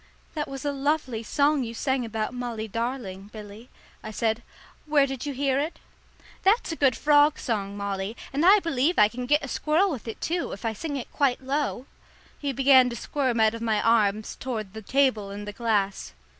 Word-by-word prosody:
"That 300 Hz, -2 st, -3 dB
was 275 Hz, 0 st, -7 dB
a 290 Hz, -, +1 dB
lovely 275 Hz, -4 st, -1 dB
song 285 Hz, +4 st, +2 dB
you 230 Hz, -1 st, -6 dB
sang 265 Hz, 0 st, 0 dB
about 220 Hz, 0 st, -3 dB
'Molly 240 Hz, -3 st, -4 dB
darling,' 220 Hz, -4 st, -4 dB
Billy," 215 Hz, +2 st, -11 dB, 0.3 s
I 215 Hz, -, -7 dB
said. 220 Hz, +1 st, -1 dB, 0.5 s
"Where 295 Hz, -2 st, +4 dB
did 270 Hz, 0 st, -5 dB
you 285 Hz, -, -2 dB
hear 270 Hz, 0 st, +1 dB
it?" 310 Hz, +4 st, -3 dB, 0.6 s
"That's 400 Hz, 0 st, +2 dB
a -, -, -2 dB
good 270 Hz, -5 st, +3 dB
frog 295 Hz, 0 st, +4 dB
song, 200 Hz, -3 st, -3 dB
Molly, 200 Hz, +2 st, -3 dB, 0.2 s
and 285 Hz, +3 st, 0 dB
I 385 Hz, +4 st, +8 dB
believe 330 Hz, +1 st, +1 dB
I 210 Hz, -, +7 dB
can 245 Hz, +2 st, -6 dB
git 295 Hz, +2 st, +3 dB
a -, -, -7 dB
squirrel 320 Hz, +8 st, +1 dB
with 245 Hz, -6 st, -6 dB
it, 225 Hz, -, -6 dB
too, 345 Hz, +1 st, -2 dB
if 200 Hz, -, -8 dB
I 225 Hz, -, 0 dB
sing 290 Hz, +7 st, -5 dB
it 250 Hz, -, -7 dB
quite 265 Hz, -2 st, +1 dB
low." 270 Hz, -1 st, -2 dB, 0.5 s
He 285 Hz, -1 st, -2 dB
began 260 Hz, -1 st, +5 dB
to 235 Hz, -, -5 dB
squirm 255 Hz, 0 st, -1 dB
out 220 Hz, 0 st, +4 dB
of 230 Hz, -, -6 dB
my 220 Hz, -2 st, +1 dB
arms 215 Hz, -2 st, +2 dB
toward 220 Hz, -7 st, -4 dB
the 220 Hz, -, -7 dB
table 240 Hz, -3 st, +1 dB
and 205 Hz, +1 st, -7 dB
the 205 Hz, -, -5 dB
glass. 205 Hz, -, -1 dB
250 Hz, 200 wpm, -26 LUFS, 220-285 Hz, 0.6 s, I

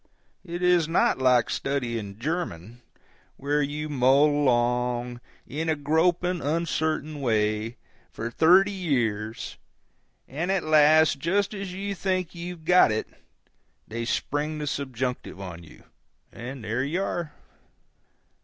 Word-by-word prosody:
It 175 Hz, -1 st, -5 dB
is 175 Hz, -3 st, +4 dB
not 165 Hz, -4 st, +2 dB
like 125 Hz, -3 st, +3 dB
studying 115 Hz, -7 st, -3 dB
German, 120 Hz, -, -4 dB, 0.6 s
where 145 Hz, +2 st, 0 dB
you 150 Hz, +2 st, -3 dB
mull 135 Hz, 0 st, +4 dB
along, 125 Hz, -3 st, 0 dB, 0.2 s
in 160 Hz, +4 st, -3 dB
a 160 Hz, -, +2 dB
groping, 170 Hz, +4 st, +1 dB
uncertain 155 Hz, -1 st, -1 dB
way, 110 Hz, -1 st, 0 dB, 0.3 s
for 115 Hz, +1 st, -5 dB
thirty 180 Hz, +9 st, +5 dB
years; 115 Hz, -, -2 dB, 0.7 s
and 165 Hz, +7 st, -2 dB
at 195 Hz, -2 st, +1 dB
last, 155 Hz, -1 st, +5 dB
just 195 Hz, +8 st, 0 dB
as 195 Hz, -2 st, -5 dB
you 200 Hz, +2 st, -3 dB
think 185 Hz, -2 st, -2 dB
you've 170 Hz, -1 st, -7 dB
got 180 Hz, -8 st, +6 dB
it, 110 Hz, -, -2 dB, 0.8 s
they 115 Hz, +1 st, -4 dB
spring 145 Hz, +6 st, -2 dB
the 150 Hz, -, -4 dB
subjunctive 130 Hz, -6 st, -3 dB
on 90 Hz, -3 st, -8 dB
you, 80 Hz, -, -16 dB, 0.5 s
and 125 Hz, +1 st, -8 dB
there 115 Hz, +4 st, -1 dB
you 170 Hz, +8 st, -1 dB
are. 170 Hz, -5 st, -3 dB
145 Hz, 125 wpm, -26 LUFS, 120-170 Hz, 0.8 s, got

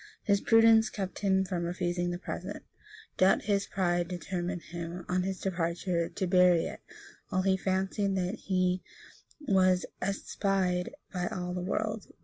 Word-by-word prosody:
His 200 Hz, -2 st, +2 dB
prudence 225 Hz, -1 st, +6 dB
kept 190 Hz, -3 st, -5 dB
him 190 Hz, -1 st, +2 dB
from 180 Hz, -2 st, -2 dB
refusing 175 Hz, 0 st, -1 dB
the 175 Hz, -, -2 dB
present; 180 Hz, -, -6 dB, 0.5 s
Dut 185 Hz, +1 st, +4 dB
his 200 Hz, -1 st, +1 dB
pride 175 Hz, -2 st, 0 dB
determined 175 Hz, 0 st, -4 dB
him, 170 Hz, +1 st, -6 dB
on 180 Hz, 0 st, +1 dB
his 190 Hz, 0 st, -3 dB
departure, 170 Hz, -1 st, -1 dB
to 190 Hz, -, -3 dB
bury 180 Hz, -2 st, +5 dB
it -, -, -7 dB, 0.5 s
while 185 Hz, 0 st, 0 dB
he 190 Hz, 0 st, +3 dB
fancied 190 Hz, +1 st, 0 dB
that 185 Hz, 0 st, -1 dB
he 185 Hz, -4 st, 0 dB, 0.6 s
was 185 Hz, -8 st, +3 dB, 0.2 s
unespied 195 Hz, -2 st, 0 dB, 0.2 s
by 180 Hz, -1 st, -1 dB
all 180 Hz, 0 st, -4 dB
the 180 Hz, -, -3 dB
world. 215 Hz, +3 st, -2 dB
185 Hz, 145 wpm, -30 LUFS, 180-195 Hz, 0.6 s, prudence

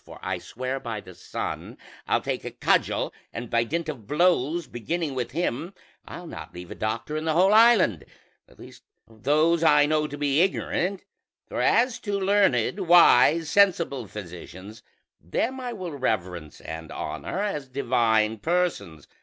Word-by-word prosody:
or -, -, -11 dB
I -, -, -2 dB
swear 130 Hz, +2 st, -5 dB
by 115 Hz, -4 st, -5 dB
the 90 Hz, -, -12 dB
sun 90 Hz, -, -6 dB, 0.3 s
I'll -, -, +2 dB
take -, -, -3 dB
a -, -, -4 dB
cudgel, -, -, 0 dB, 0.2 s
and 120 Hz, 0 st, -7 dB
by 115 Hz, 0 st, +3 dB
dint 165 Hz, +7 st, -3 dB
of 130 Hz, -9 st, -7 dB
blows, 170 Hz, +1 st, +2 dB
beginning 155 Hz, +5 st, -3 dB
with 125 Hz, -3 st, -3 dB
him, 165 Hz, +4 st, -3 dB, 0.3 s
I'll 175 Hz, -, -8 dB
not 165 Hz, -, -9 dB
leave 90 Hz, 0 st, -9 dB
a -, -, -3 dB
doctor 110 Hz, +7 st, -3 dB
in 155 Hz, +1 st, -3 dB
the 160 Hz, -, +1 dB
whole 185 Hz, +5 st, +4 dB
island: 215 Hz, -, +5 dB, 0.4 s
at -, -, -22 dB
least -, -, -13 dB, 0.3 s
of 110 Hz, -1 st, -20 dB
those 155 Hz, +5 st, +3 dB
I 150 Hz, -2 st, +6 dB
know 155 Hz, 0 st, +1 dB
to 145 Hz, -, -8 dB
be 145 Hz, +1 st, +2 dB
ignorant; 190 Hz, 0 st, -1 dB, 0.4 s
for -, -, -3 dB
as 240 Hz, +1 st, +2 dB
to 205 Hz, -2 st, -2 dB
learned, 190 Hz, -, +2 dB
wise, 165 Hz, -2 st, +6 dB
sensible 170 Hz, -, +2 dB
physicians, 95 Hz, +2 st, -10 dB, 0.4 s
them 230 Hz, -, -2 dB
I 250 Hz, -1 st, -4 dB
will 185 Hz, -7 st, -6 dB
reverence 90 Hz, -, -3 dB
and 80 Hz, 0 st, -8 dB
honor -, -, -5 dB
as 195 Hz, -9 st, -2 dB
divine 115 Hz, -4 st, +1 dB
persons. 105 Hz, -, -2 dB
145 Hz, 160 wpm, -25 LUFS, 110-175 Hz, 0.4 s, I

